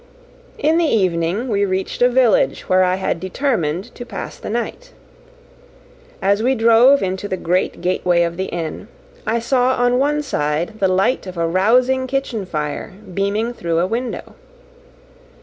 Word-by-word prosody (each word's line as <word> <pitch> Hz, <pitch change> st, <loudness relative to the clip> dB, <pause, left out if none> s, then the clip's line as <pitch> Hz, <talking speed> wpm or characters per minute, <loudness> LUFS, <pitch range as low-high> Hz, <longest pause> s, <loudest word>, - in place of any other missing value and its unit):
In 315 Hz, +3 st, +2 dB
the 340 Hz, -, +2 dB
evening 185 Hz, +2 st, 0 dB
we 205 Hz, -4 st, +1 dB
reached 190 Hz, +2 st, -2 dB
a 245 Hz, -, +6 dB
village 250 Hz, -3 st, +3 dB
where 185 Hz, 0 st, +4 dB
I 180 Hz, 0 st, +2 dB
had 190 Hz, -3 st, -2 dB
determined 185 Hz, -, -2 dB
to 245 Hz, -, -8 dB
pass 200 Hz, -6 st, -7 dB
the -, -, -7 dB
night. 240 Hz, -, -4 dB, 1.3 s
As 200 Hz, +2 st, +2 dB
we 260 Hz, +3 st, +2 dB
drove 235 Hz, +4 st, +5 dB
into 190 Hz, +1 st, -3 dB
the 190 Hz, -, -3 dB
great 180 Hz, +1 st, -1 dB
gateway 175 Hz, -1 st, +1 dB
of 170 Hz, 0 st, -2 dB
the 190 Hz, +2 st, -2 dB
inn, 165 Hz, +3 st, -5 dB, 0.4 s
I 225 Hz, +2 st, +1 dB
saw 250 Hz, +2 st, +1 dB
on 245 Hz, +1 st, +2 dB
one 295 Hz, +2 st, +1 dB
side 165 Hz, -, -2 dB
the 195 Hz, -, +3 dB
light 190 Hz, +4 st, +1 dB
of 185 Hz, -1 st, -8 dB
a 165 Hz, 0 st, +1 dB
rousing 250 Hz, +9 st, +2 dB
kitchen 255 Hz, -7 st, -2 dB
fire 150 Hz, +2 st, -4 dB, 0.2 s
beaming 205 Hz, +5 st, -1 dB
through 170 Hz, -7 st, -2 dB
a 170 Hz, -, +2 dB
window. 235 Hz, +5 st, -4 dB
200 Hz, 160 wpm, -19 LUFS, 180-245 Hz, 1.3 s, a